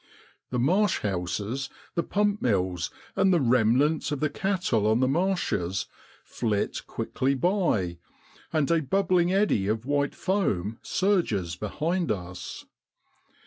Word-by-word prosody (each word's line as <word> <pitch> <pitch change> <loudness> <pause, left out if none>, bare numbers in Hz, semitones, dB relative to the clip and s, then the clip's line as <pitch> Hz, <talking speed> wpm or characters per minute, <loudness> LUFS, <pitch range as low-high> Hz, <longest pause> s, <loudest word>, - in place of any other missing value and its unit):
The 125 - -2
marsh 185 - +2
houses, 105 +7 -2 0.2
the 170 - +1
pump 205 +3 0
mills, 90 -6 0 0.3
and 190 0 +4
the 175 - +4
remnant 125 +5 +3
of 145 - -1
the 150 0 0
cattle 180 - 0
on 110 +2 +3
the 130 - +3
marshes 135 - 0 0.4
flit 105 -4 -2
quickly 135 +1 -1
by, 130 - +1 0.5
and 155 -1 +1
a 165 -1 +3
bubbling 180 +3 +2
eddy 190 - +2
of 110 +2 -1
white 145 0 0
foam 115 - -1
surges 140 - 0
behind 160 - -1
us. 90 -3 -6
135 Hz, 125 wpm, -27 LUFS, -, 0.5 s, and